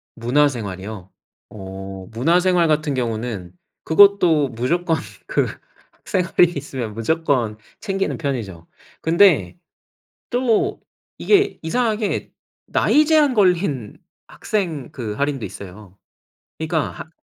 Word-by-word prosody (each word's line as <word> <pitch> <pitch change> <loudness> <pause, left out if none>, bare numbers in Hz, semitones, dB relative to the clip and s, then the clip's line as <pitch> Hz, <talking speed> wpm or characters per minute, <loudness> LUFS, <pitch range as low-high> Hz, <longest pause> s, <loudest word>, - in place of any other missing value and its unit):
문화생활이요? 110 -7 -1 0.4
어 95 -1 -8
문화생활 170 +7 +3
같은 150 -2 +1
경우는 115 -6 -3 0.3
그것도 170 -5 +5
무조건 165 +9 0 0.3
그 - - +1 0.6
생활이 175 -1 +2
있으면 130 -6 -5
무조건 120 -3 0 0.2
챙기는 195 -2 -2
편이죠. 110 - -4 0.3
근데 160 - +4 0.7
또 245 -3 +1 0.4
이게 405 -1 +2
이상하게 215 +4 -1 0.4
나이 305 +1 +3
제한 305 -3 +4
걸린 175 - +1 0.3
학생 170 - -3
그 115 -5 -5
할인도 140 0 -2
있어요. 100 0 -11 0.6
그러니까 160 -1 -3
145 Hz, 230 characters per minute, -21 LUFS, 110-180 Hz, 0.7 s, 그것도